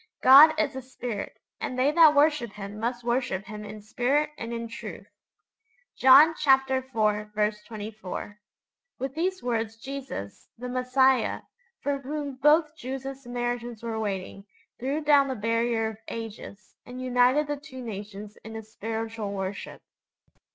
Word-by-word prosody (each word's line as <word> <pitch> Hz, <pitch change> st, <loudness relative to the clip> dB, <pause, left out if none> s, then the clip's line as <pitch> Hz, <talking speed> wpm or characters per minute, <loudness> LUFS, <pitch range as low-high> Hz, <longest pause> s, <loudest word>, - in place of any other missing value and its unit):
'God 305 Hz, +4 st, +9 dB
is 295 Hz, -4 st, 0 dB
a 265 Hz, -, -4 dB
Spirit: 245 Hz, -4 st, -6 dB, 0.2 s
and 255 Hz, -, -4 dB
they 265 Hz, +3 st, +3 dB
that 310 Hz, -1 st, +6 dB
worship 290 Hz, -7 st, +3 dB
Him 205 Hz, +1 st, -8 dB
must 240 Hz, +2 st, -2 dB
worship 235 Hz, -5 st, -1 dB
Him 210 Hz, +1 st, -8 dB
in 210 Hz, 0 st, -9 dB
spirit 275 Hz, +7 st, 0 dB
and 230 Hz, -4 st, -6 dB
in 230 Hz, 0 st, -4 dB
truth.' 230 Hz, -, -8 dB, 0.9 s
(John 275 Hz, +5 st, +7 dB
iv. 265 Hz, -1 st, +3 dB
24.) 210 Hz, -1 st, -2 dB, 0.6 s
With 270 Hz, 0 st, -4 dB
these 370 Hz, +4 st, -2 dB
words 230 Hz, -2 st, -2 dB
Jesus, 265 Hz, -, -7 dB
the 250 Hz, +2 st, -6 dB
Messiah, 255 Hz, +1 st, +2 dB, 0.4 s
for 285 Hz, -1 st, -1 dB
whom 280 Hz, 0 st, -5 dB
both 305 Hz, +2 st, +4 dB
Jews 270 Hz, -3 st, -6 dB
and 270 Hz, 0 st, -4 dB
Samaritans 240 Hz, -2 st, -4 dB
were 225 Hz, -1 st, -3 dB
waiting, 195 Hz, -1 st, -4 dB, 0.3 s
threw 275 Hz, +5 st, -2 dB
down 285 Hz, -2 st, +5 dB
the 260 Hz, -, -3 dB
barrier 230 Hz, +1 st, 0 dB
of 215 Hz, -, -13 dB
ages, 215 Hz, -3 st, -8 dB
and 250 Hz, +1 st, -9 dB
united 255 Hz, +3 st, +3 dB
the 290 Hz, 0 st, -3 dB
two 270 Hz, -3 st, -10 dB
nations 210 Hz, -1 st, -8 dB
in 220 Hz, +1 st, -9 dB
a 220 Hz, -, -6 dB
spiritual 220 Hz, 0 st, -5 dB
worship. 195 Hz, 0 st, -5 dB
245 Hz, 145 wpm, -27 LUFS, 215-270 Hz, 0.9 s, God